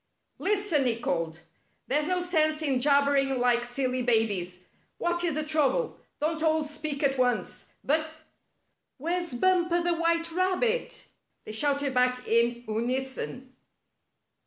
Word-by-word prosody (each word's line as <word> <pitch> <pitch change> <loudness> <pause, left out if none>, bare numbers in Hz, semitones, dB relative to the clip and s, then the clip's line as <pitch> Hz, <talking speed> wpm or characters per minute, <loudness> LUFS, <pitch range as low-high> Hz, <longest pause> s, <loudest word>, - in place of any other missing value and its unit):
" - - -46
Lis 410 0 0
ten," 285 -5 +3
he 230 -2 +1
called. 165 -5 -2 0.2
" - - -43
There's 295 +3 +1
no 365 0 +1
sense 310 -3 +1
in 270 -4 +1
jabbering 280 -1 +3
like 245 -1 +2
silly 255 +1 -1
babies. 200 -7 0 0.3
What 345 0 -1
is 330 -4 0
the 310 - 0
trouble? 305 - +1 0.2
Don't 315 +1 -1
all 315 -1 +2
speak 300 -1 -3
at 270 -1 +1
once, 250 -1 -1 0.2
but 310 +2 +1 0.3
— - - -47
" - - -51
"Where's 340 0 -2
Bumper 350 +3 +2
the 345 0 +1
White 335 0 0
Rabbit!" 375 +8 0 0.4
they - - -6
shouted 280 +4 +1
back 250 0 +1
in 235 +1 +2
unison. 255 +3 -3
285 Hz, 150 wpm, -27 LUFS, 250-335 Hz, 0.4 s, ten